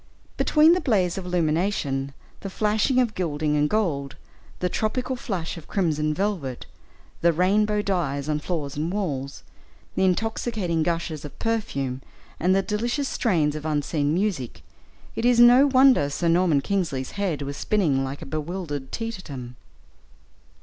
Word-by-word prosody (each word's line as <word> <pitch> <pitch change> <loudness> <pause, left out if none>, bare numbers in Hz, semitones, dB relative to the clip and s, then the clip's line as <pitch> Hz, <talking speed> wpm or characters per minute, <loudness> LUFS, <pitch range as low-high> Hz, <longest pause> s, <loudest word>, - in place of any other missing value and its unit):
Between 310 +2 +5
the 360 - +1
blaze 190 - +1
of 180 - -8
illumination, 160 -5 0 0.3
the 195 - -6
flashing 215 +6 +1
of 240 -4 +1
gilding 155 -4 -1
and 150 0 +2
gold, 150 -11 -1 0.4
the 180 - -1
tropical 250 +7 -1
flush 190 -10 -4
of 160 - -11
crimson 155 -5 0
velvet, 155 -7 -2 0.6
the 170 - +5
rainbow 205 +5 +2
dyes 150 -8 -1
on 150 -1 0
floor 155 -2 -3
and 155 +4 -2
walls, 145 -9 -3 0.5
the - - 0
intoxicating 190 -2 0
gushes 165 -2 -2
of 150 - -9
perfume, 140 - -2 0.4
and 185 +2 +3
the 195 - +2
delicious 240 +7 -1
strains 155 -9 +1
of 155 - -5
unseen 150 -1 0
music, 155 - -2 0.5
it 225 - -3
is 245 0 +4
no 245 +4 +8
wonder 260 - +5
Sir 170 +4 -1
Norman 165 -4 +3
Kingsley's 150 -7 -2
head 185 -8 -2
was 140 0 -5
spinning 150 -8 +1
like 135 +1 -5
a - - -8
bewildered 150 -2 -4
teetotum. 160 - -6
175 Hz, 145 wpm, -24 LUFS, 145-210 Hz, 0.6 s, no